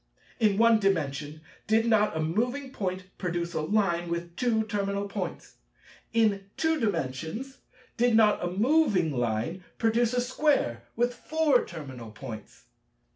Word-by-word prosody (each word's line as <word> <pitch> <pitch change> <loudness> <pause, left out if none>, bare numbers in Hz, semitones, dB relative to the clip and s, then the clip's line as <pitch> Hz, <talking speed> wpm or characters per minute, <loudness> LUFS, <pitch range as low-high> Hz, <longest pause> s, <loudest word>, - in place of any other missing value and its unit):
In 210 -3 +3
One 230 0 +5
Dimension, 155 -6 -1 0.3
did 220 +1 +3
not 215 -6 +3
a - - -1
moving 245 - -1
Point 185 -6 -3 0.2
produce 170 -1 -2
a - - -1
Line 175 -1 +1
with 170 0 -4
two 225 0 +1
terminal 200 -2 -2
points? 200 - -6 0.5
In 215 -4 +2
Two 320 -1 +1
Dimensions, 175 - -3 0.4
did 240 -1 +3
not 215 -4 +4
a 175 - 0
moving 205 - +2
Line 120 +8 -2
produce 230 +1 +2
a 245 - +2
Square 255 - +1
with 240 +1 +1
four 310 -1 +2
terminal 130 -8 -8
points? 110 0 -9
200 Hz, 135 wpm, -28 LUFS, 165-235 Hz, 0.5 s, One